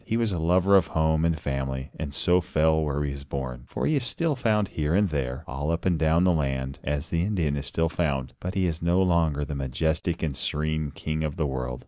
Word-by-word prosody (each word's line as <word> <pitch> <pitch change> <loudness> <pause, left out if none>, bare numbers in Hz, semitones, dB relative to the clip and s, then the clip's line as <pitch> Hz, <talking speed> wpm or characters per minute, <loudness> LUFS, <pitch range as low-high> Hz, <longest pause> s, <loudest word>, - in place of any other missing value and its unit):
He 115 - -1
was 115 -2 +1
a 90 - -2
lover 90 +4 +4
of 90 -4 +5
home 80 0 +1
and 85 -2 +1
family, 70 -2 -3
and 75 -3 -5
so 90 +5 +2
fell 80 -1 +2
where 75 -1 -1
he 70 - -2
was 70 0 -7
born. 65 -3 -5
For - - -3
he 155 - +2
is 135 - -1
still 145 +7 0
found 110 -5 +1
here 75 +1 -1
and 100 0 +3
there, 70 -1 -2
all 70 +3 -3
up 85 0 -1
and 90 -4 +2
down 80 +2 +3
the 90 - +4
land, 65 -3 -2
as 75 0 -2
the 85 - +1
Indian 85 -7 0
is 70 0 -3
still 80 0 +1
found, 70 -6 -1
but 90 +2 -4
he 95 -1 +2
is 80 -2 -2
no 85 +2 +2
longer 80 -5 +2
the 75 - -5
majestic 80 +6 -1
and 75 -4 -1
serene 75 +1 -1
king 80 +2 -3
of 75 -2 -2
the 80 - 0
world. 65 -3 -3
80 Hz, 245 wpm, -26 LUFS, 70-85 Hz, -, of